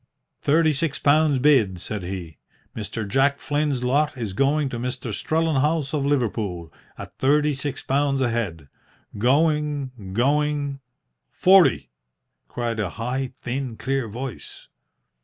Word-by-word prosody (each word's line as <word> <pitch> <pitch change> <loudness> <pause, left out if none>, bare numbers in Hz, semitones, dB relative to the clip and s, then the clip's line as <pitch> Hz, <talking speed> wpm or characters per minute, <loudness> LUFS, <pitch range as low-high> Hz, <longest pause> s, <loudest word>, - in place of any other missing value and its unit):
"Thirty 155 +1 +3
six 145 0 -1
pounds 150 0 +3
bid," 125 -10 +3
said 105 +3 -5
he. 90 -4 -6 0.4
"Mr. 105 0 -4
Jack 135 +5 +2
Flynn's 145 -3 -1
lot 145 +3 +1
is 110 -6 -4
going 140 +6 +2
to 120 - -5
Mr. 125 -2 -4
Strellenhaus 155 +1 0
of 140 -2 0
Liverpool, 105 - -1 0.2
at - - -9
thirty 150 +2 +3
six 140 +1 -5
pounds 140 0 +1
a 130 -2 +1
head. 95 -11 -3 0.5
Going 145 +2 +1 0.2
going 145 +3 +1 0.3
" - - -54
"Forty!" 190 -1 +5 0.6
cried 115 -2 -3
a 105 -4 -1
high, 125 +3 -3
thin, 125 -2 -3
clear 135 -3 -1
voice. 125 +4 -8
135 Hz, 130 wpm, -23 LUFS, 115-145 Hz, 0.6 s, Forty